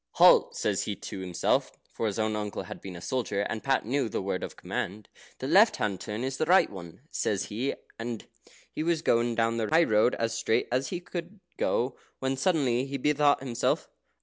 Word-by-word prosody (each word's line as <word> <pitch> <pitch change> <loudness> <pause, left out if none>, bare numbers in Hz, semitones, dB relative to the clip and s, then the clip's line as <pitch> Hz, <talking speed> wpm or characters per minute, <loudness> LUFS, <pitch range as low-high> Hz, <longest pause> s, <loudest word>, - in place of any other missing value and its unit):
"Halt!" - - +6
says - - 0
he - - -2
to - - -7
himself 90 -2 0 0.2
(for 115 - -1
his 105 - -2
own 110 -1 0
uncle 105 -1 -3
had - - -9
been 95 -2 -8
a 85 - -8
soldier, 110 -3 -1
and 110 +2 -3
Pat 135 -4 +1
knew 130 0 0
the - - -2
word 95 -1 -2
of - - -6
command). 105 +3 -4 0.3
"The - - -5
left - - +6
hand 100 -4 -2
turn 110 +2 -4
is 130 0 -2
the 155 - 0
right 185 +2 +5
one," 85 0 -10
says 100 -2 0
he, 130 +6 -1 0.2
and 115 -1 -4 0.5
he - - -4
was 165 0 0
going 115 0 +2
down 115 0 +1
the 110 -2 -1
high 165 +1 +5
road 110 -3 +3
as 115 0 -1
straight 115 - +1
as 130 +2 +1
he 180 -1 -4
could 175 +3 -7 0.2
go, 125 +3 0 0.2
when 135 0 -1
suddenly 135 -4 +1
he 140 0 -3
bethought 145 +1 +3
himself. 125 -3 -1
120 Hz, 205 wpm, -28 LUFS, 105-140 Hz, 0.5 s, Halt